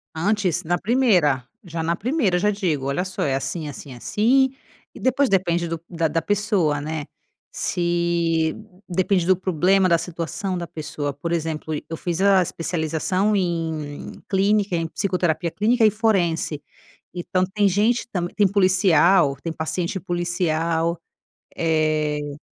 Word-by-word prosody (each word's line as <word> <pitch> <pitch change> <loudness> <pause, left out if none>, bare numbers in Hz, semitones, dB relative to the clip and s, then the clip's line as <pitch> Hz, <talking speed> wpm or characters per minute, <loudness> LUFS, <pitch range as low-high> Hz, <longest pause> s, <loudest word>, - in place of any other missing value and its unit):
Antes 185 0 0
na 175 +2 0
primeira, 190 - +2 0.2
já 165 -2 -4
na 170 +1 0
primeira 225 - 0
eu - - 0
já 210 +2 +2
digo, 175 -10 -1
olha 180 +7 -1
só 185 - -5
é 135 -2 +1
assim, 135 +4 -3
assim, 140 -1 -9
assim 245 - +2 0.4
e - - -12
depois 265 +1 +2
depende 175 -3 +1
do 165 -1 -4
da 165 -2 0
da 165 +1 -1
pessoa 190 -6 +1
né. 155 -1 -4 0.5
Se 170 -2 0 0.3
depende 185 0 +1
do 185 +1 +4
problema, 185 +1 +2
da 170 - +5
situação 175 +3 -4
da 170 -1 -5
pessoa, 145 -2 -4
por 170 +4 -5
exemplo 160 -1 -2
eu 165 - -5
fiz 175 +2 -2
a 195 -2 +5
especialização 175 +4 -1
em 160 -5 -3
clínica, 200 0 +2
em 165 -1 -1
psicoterapia 175 -3 -1
clínica 225 +2 +2
e 215 - +5
forense, 175 -9 0 0.5
então 185 +1 -1
tem 205 -1 +3
gente 215 +6 +1
também 175 -2 -3
tem 205 -2 +4
policial, 185 -5 +4
tem 165 - -3
paciente 170 +4 -2
policial 170 -1 -1 0.6
eh 155 -2 0
175 Hz, 145 wpm, -22 LUFS, 160-195 Hz, 0.6 s, da